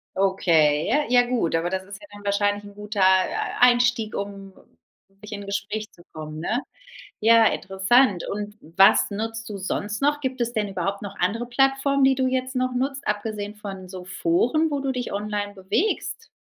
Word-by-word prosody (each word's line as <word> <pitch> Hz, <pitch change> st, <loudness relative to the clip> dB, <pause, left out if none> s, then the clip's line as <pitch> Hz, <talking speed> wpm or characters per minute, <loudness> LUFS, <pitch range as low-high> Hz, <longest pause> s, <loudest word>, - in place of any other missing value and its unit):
Okay, 165 Hz, -6 st, +2 dB
ja 295 Hz, +4 st, +2 dB
ja 245 Hz, 0 st, +4 dB
gut, 235 Hz, -10 st, 0 dB
aber 165 Hz, +2 st, 0 dB
das 190 Hz, +1 st, -3 dB
ist 200 Hz, +1 st, -10 dB
ja 205 Hz, -, -13 dB
dann 205 Hz, 0 st, -13 dB
wahrscheinlich 205 Hz, 0 st, 0 dB
'n 205 Hz, -, -12 dB
guter, 210 Hz, 0 st, -6 dB
äh, 190 Hz, 0 st, +2 dB
Einstieg, 245 Hz, -2 st, +4 dB
um 200 Hz, -1 st, -6 dB, 0.7 s
sich 210 Hz, +1 st, -11 dB
in 205 Hz, -, -5 dB
'nen 200 Hz, -, -9 dB
Gespräch 210 Hz, +2 st, -3 dB
zu 175 Hz, -, -18 dB
kommen, 155 Hz, -1 st, -7 dB
ne? 220 Hz, +10 st, -1 dB, 0.6 s
Ja, 225 Hz, +1 st, +6 dB
interessant. 195 Hz, +1 st, +2 dB
Und 210 Hz, 0 st, -5 dB
was 190 Hz, +6 st, +4 dB
nutzt 225 Hz, +2 st, -4 dB
du 200 Hz, -, -5 dB
sonst 205 Hz, +4 st, -3 dB
noch? 295 Hz, +1 st, +1 dB
Gibt 260 Hz, -1 st, -3 dB
es 240 Hz, 0 st, -1 dB
denn 210 Hz, -3 st, -1 dB
überhaupt 195 Hz, +1 st, -3 dB
noch 200 Hz, -, -8 dB
andere 225 Hz, +7 st, 0 dB
Plattformen, 270 Hz, +2 st, +2 dB
die 265 Hz, 0 st, +4 dB
du 260 Hz, 0 st, +1 dB
jetzt 255 Hz, 0 st, -2 dB
noch 255 Hz, 0 st, 0 dB
nutzt, 275 Hz, +2 st, -2 dB
abgesehen 210 Hz, 0 st, -3 dB
von 195 Hz, -3 st, -8 dB
so 185 Hz, -1 st, -8 dB
Foren, 210 Hz, -, +1 dB
wo 285 Hz, -, -1 dB
du 270 Hz, -1 st, -1 dB
dich 250 Hz, -1 st, -4 dB
online 205 Hz, 0 st, -3 dB
bewegst? 390 Hz, -, -2 dB
210 Hz, 185 wpm, -24 LUFS, 195-245 Hz, 0.7 s, Ja